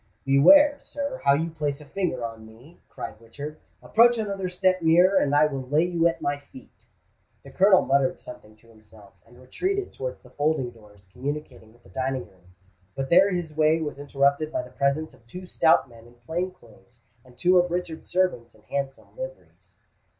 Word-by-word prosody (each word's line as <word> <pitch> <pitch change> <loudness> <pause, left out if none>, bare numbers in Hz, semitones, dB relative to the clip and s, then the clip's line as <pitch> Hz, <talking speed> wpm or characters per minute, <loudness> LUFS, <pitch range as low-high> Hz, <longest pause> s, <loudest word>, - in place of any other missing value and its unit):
"Beware, 285 - +6
sir, 280 -2 -6
how 140 0 +5
you 165 +3 -2
place 150 -3 -3
a 150 - -13
finger 155 -10 -2
on 115 -1 -8
me!" 115 +10 -17
cried 110 - -8
Richard. 145 +7 -9 0.2
"Approach 240 +1 +4
another 200 -4 -3
step 185 0 +1
nearer, 175 +4 +4
and 145 0 +1
I 150 +1 +5
will 135 -3 -3
lay 150 +3 +3
you 170 -1 +2
at 170 - -3
my 145 0 -1
feet!" 140 -2 -17 0.6
The - - -13
Colonel 195 0 +5
muttered 135 -1 +1
something 110 -3 -12
to 110 +2 -25
himself, 110 -2 -18
and 120 +2 -19
retreated 375 - -3
towards 130 -1 -6
the 125 - -17
folding 145 -3 -1
doors 105 -4 -19
communicating 130 -4 -6
with 120 +1 -25
the - - -19
dining 130 +5 -3
room; 90 -1 -25 0.4
but 135 0 -4
there 185 +3 +6
his 175 -4 -4
way 155 +1 +3
was 150 -3 -5
interrupted 140 +2 +1
by - - -2
the 125 - -13
presence 140 +3 -1
of 130 -2 -22
two 180 +9 -9
stout 165 -3 +3
men 115 -1 -16
in 120 - -20
plain 160 +10 -3
clothes 120 - -22 0.2
and 125 -1 -20
two 180 +7 +4
of 175 0 +1
Richard's 170 -2 -5
servants 175 -12 -1
in 105 - -23
handsome 140 +2 -5
liveries. - - -10
145 Hz, 190 wpm, -25 LUFS, 125-175 Hz, 0.6 s, Beware